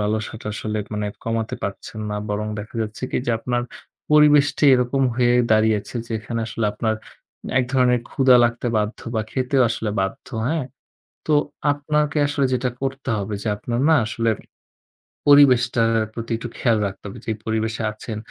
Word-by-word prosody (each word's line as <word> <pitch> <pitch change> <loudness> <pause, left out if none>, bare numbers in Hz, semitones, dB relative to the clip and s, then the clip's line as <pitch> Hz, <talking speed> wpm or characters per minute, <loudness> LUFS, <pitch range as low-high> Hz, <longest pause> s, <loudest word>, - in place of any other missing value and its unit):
লালসাটা 110 +1 -3
আসলে 110 0 -3
মানে 105 0 -2 0.2
কমাতে 115 -1 -2
পারছেন 100 +2 -5
না 105 - -2
বরং 105 +1 -2
দেখা 105 +3 -8
যাচ্ছে 110 +2 -7
কী - - -1
যে 120 - +2
আপনার 120 +1 -1 0.5
পরিবেশটি 150 -1 +5
এরকম 125 +2 +1
হয়ে 120 0 +3 0.2
দাঁড়িয়েছে 110 0 +2
যেখানে 115 +1 -3
আসলে 115 -1 -3
আপনার 110 +1 -1 0.6
এক 130 - +2
ধরনের 125 -2 +3
ক্ষুধা 130 -2 +5
লাগতে 120 +1 -1
বাধ্য 105 +1 -1 0.2
বা 110 - +1
খেতেও 130 0 +1
আসলে 110 -1 -2
বাধ্য, 95 0 -3 0.2
হ্যাঁ? 160 -2 0 0.6
তো 155 - +2 0.4
আপনাকে 150 +1 0
আসলে 145 -1 0
যেটা 125 0 0
করতে 135 0 -3
হবে 100 +1 -4
যে - - -3
আপনার 120 +2 -3
না 160 - +6
আসলে 115 +1 -1 1.0
পরিবেশটার 125 -5 +5 0.2
প্রতি 115 +1 -6
একটু 120 +1 -6
খেয়াল 115 -3 +2
রাখতে 95 - -9
হবে। 100 - -8
যেই 110 -1 -2
পরিবেশে 110 0 -1
আছেন 110 0 -7
115 Hz, 155 wpm, -22 LUFS, 110-130 Hz, 1.0 s, না